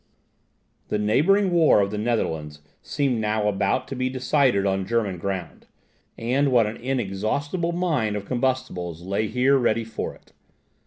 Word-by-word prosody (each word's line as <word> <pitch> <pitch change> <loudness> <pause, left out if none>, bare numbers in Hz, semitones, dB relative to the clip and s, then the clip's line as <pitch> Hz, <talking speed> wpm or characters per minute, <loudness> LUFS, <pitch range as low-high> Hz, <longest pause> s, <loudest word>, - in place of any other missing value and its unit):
The - - -1
neighbouring 170 - +3
war 165 -10 +5
of 100 -1 +1
the 105 - -3
Netherlands 80 -10 -2 0.2
seemed 130 -6 -1
now 105 -1 0
about 105 +5 0
to 135 - -4
be 130 0 -1
decided 130 -5 +2
on 95 -1 0
German 105 -5 -1
ground; 95 -2 -5 0.5
and 130 +4 +1
what 120 -3 +5
an 105 +2 -4
inexhaustible 130 - -2
mine 155 -12 0
of 100 -1 -4
combustibles 120 -10 -2
lay 100 +4 -1
here 130 +4 +3
ready 115 -2 +1
for 115 - -5
it! - - -24
115 Hz, 150 wpm, -24 LUFS, 100-130 Hz, 0.5 s, war